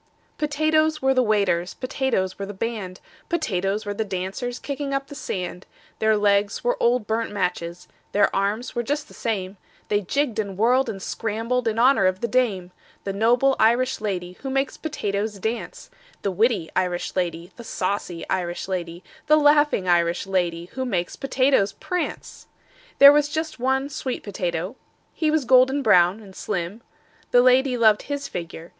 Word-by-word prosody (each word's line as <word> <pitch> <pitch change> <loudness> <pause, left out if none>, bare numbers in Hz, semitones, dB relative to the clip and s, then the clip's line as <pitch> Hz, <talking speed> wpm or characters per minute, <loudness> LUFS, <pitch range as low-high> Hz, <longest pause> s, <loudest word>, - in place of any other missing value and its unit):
"Potatoes 310 +1 +1
were 265 -1 +2
the 255 - +3
waiters, 200 -6 +1
Potatoes 255 -8 -2
were 200 - -3
the 205 - -7
band, 200 -4 -4 0.3
Potatoes 210 - -1
were 205 - -3
the 220 - -2
dancers 195 +5 -4
Kicking 280 0 -4
up 275 0 -2
the - - -8
sand: 180 -8 -5 0.3
Their 220 0 +3
legs 205 0 +1
were - - +2
old 240 -1 +2
burnt 225 +1 -1
matches, 180 -3 -3 0.2
Their 205 - +2
arms 205 +5 -1
were 240 - -1
just 290 +5 -2
the - - -16
same, 195 -3 -3 0.3
They 205 0 +2
jigged 245 +2 -1
and 200 -3 -3
whirled 250 +5 +3
and 195 - -5
scrambled 230 +5 -2
In 225 0 0
honor 240 -5 +5
of 185 0 0
the 235 - 0
dame: 210 -7 0 0.3
The 195 - -3
noble 245 +6 +3
Irish 240 +3 +2
lady 180 -4 -4
Who 270 - -4
makes 270 0 -1
potatoes 210 -8 -3
dance, 220 - -5 0.3
The 200 - 0
witty 200 -3 +1
Irish 180 -1 -1
lady, 175 -1 -2
The 235 - -10
saucy 185 -5 -3
Irish 175 0 -2
lady, 175 -2 -4 0.2
The 305 +1 +6
laughing 295 -9 +3
Irish 175 0 +2
lady 175 -3 -1
Who 260 - -3
makes 185 -8 -2
potatoes 265 -6 +2
prance. 360 -1 -5 0.5
"There 280 +1 +10
was 295 0 +2
just 315 -1 -3
one 265 +2 +1
sweet 265 -3 -4
potato. 185 +1 -3 0.4
He 315 - 0
was 305 -3 +1
golden 260 +3 +4
brown 185 -1 +4
and 195 -3 -14
slim: 195 +2 -4 0.5
The 245 0 +5
lady 255 0 +4
loved 220 -3 +4
his 285 0 -4
figure. 170 -1 -7
220 Hz, 165 wpm, -23 LUFS, 185-265 Hz, 0.5 s, There